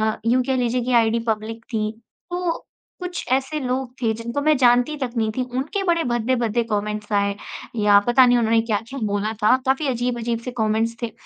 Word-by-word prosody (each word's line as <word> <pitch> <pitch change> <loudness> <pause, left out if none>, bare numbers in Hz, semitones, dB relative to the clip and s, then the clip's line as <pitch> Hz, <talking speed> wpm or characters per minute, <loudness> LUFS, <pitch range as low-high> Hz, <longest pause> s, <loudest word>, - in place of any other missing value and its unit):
अ, - - -18
यूँ 250 +2 +3
कह 265 +1 0
लीजिए 245 0 0
कि 255 - 0
आईडी 225 +1 +1
पब्लिक 220 +1 -3
थी, 215 -1 0 0.4
तो 355 -1 -1 0.4
कुछ 360 -1 -5
ऐसे 270 +3 0
लोग 255 -1 -2
थे 225 -2 +2
जिनको 235 +5 -4
मैं 305 0 +3
जानती 245 +4 +3
तक 245 - -3
नहीं 220 -1 +1
थी, 255 - +1
उनके 275 +10 -2
बड़े 340 -3 +2
भद्दे-भद्दे 240 -1 0
कॉमेंट्स 210 +1 -3
आए 200 0 +1 0.5
या 205 -1 +7
पता 250 +2 +6
नहीं 245 0 +4
उन्होंने 225 0 +3
क्या-क्या 225 +4 -3
बोला 205 +2 -1
था, 215 +4 +5
काफ़ी 270 +3 +1
अजीब-अजीब 240 -2 -1
से 250 - -3
कॉमेंट्स 220 +1 +1
थे। 230 - -2
240 Hz, 190 wpm, -22 LUFS, 220-260 Hz, 0.5 s, या